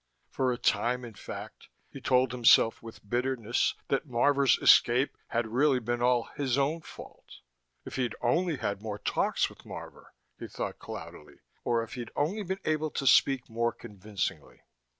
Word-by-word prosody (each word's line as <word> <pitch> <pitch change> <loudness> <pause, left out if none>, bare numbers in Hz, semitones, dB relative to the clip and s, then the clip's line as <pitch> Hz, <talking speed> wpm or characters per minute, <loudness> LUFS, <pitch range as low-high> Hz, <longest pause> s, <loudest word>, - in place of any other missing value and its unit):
For 130 -1 0
a 120 - -2
time, 125 +1 0
in 115 - -10
fact, 100 - -9 0.2
he - - -11
told 125 -1 +2
himself 120 -2 +4
with 115 -2 -12
bitterness 120 0 0
that 140 +3 0
Marvor's 135 +2 +3
escape 125 +4 +5
had 120 0 -1
really 130 +5 +2
been 120 0 -2
all 125 -1 +3
his 135 -3 0
own 145 +4 0
fault. - - -13 0.4
If - - -7
he'd 125 -4 -1
only 165 +8 +1
had 100 -5 -3
more 105 -2 -5
talks - - 0
with - - -15
Marvor, - - -10 0.2
he - - -6
thought - - -5
cloudily, 75 - -10 0.2
or 115 -1 +1
if 115 - -10
he'd 120 -3 -6
only 175 +9 0
been 190 0 -4
able 155 0 0
to 140 - -4
speak 135 -1 +4
more 115 +1 0
convincingly.... 105 -3 -6
125 Hz, 165 wpm, -29 LUFS, 115-140 Hz, 0.4 s, escape